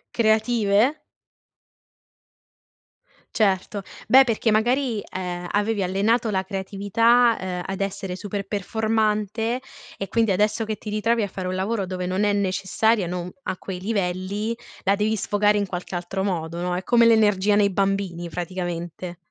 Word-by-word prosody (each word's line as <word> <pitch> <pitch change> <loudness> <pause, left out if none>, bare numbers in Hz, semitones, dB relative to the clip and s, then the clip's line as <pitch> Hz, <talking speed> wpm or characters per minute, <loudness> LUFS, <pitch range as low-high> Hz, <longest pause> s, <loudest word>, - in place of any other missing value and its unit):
Creative? 220 +2 +3 2.4
Certo, 200 -1 +1 0.3
beh 265 +1 +8
perché 230 -2 +1
magari 240 +1 +1
eh 180 -2 -5
avevi 205 0 0
allenato 210 +6 +1
la 190 -3 0
creatività 205 +5 +2
eh 180 -1 -3
ad 195 0 -5
essere 195 -1 -3
super 200 +1 -5
performante 220 +2 0 0.4
e 195 - -5
quindi 225 -1 +2
adesso 210 +3 +1
che 215 -1 -2
ti 210 - -7
ritrovi 225 +2 +1
a 205 - -1
fare 185 -1 -5
un 185 - -2
lavoro 195 +2 -1
dove 180 0 -4
non 185 +3 0
è 205 0 +2
necessaria, 195 +1 +1
non 180 +1 -4
a 185 - -2
quei 180 0 -7
livelli, 200 +2 -2 0.3
la 195 +1 +3
devi 215 +2 +1
sfogare 205 0 +2
in 205 -1 0
qualche 180 0 -6
altro 180 +2 -3
modo, 170 -3 -2
no, 180 0 -1
è 180 - -3
come 235 +4 +4
l'energia 210 -3 +4
nei 205 -1 +4
bambini 195 -3 -1
praticamente. 175 0 -5
200 Hz, 145 wpm, -23 LUFS, 185-220 Hz, 2.4 s, beh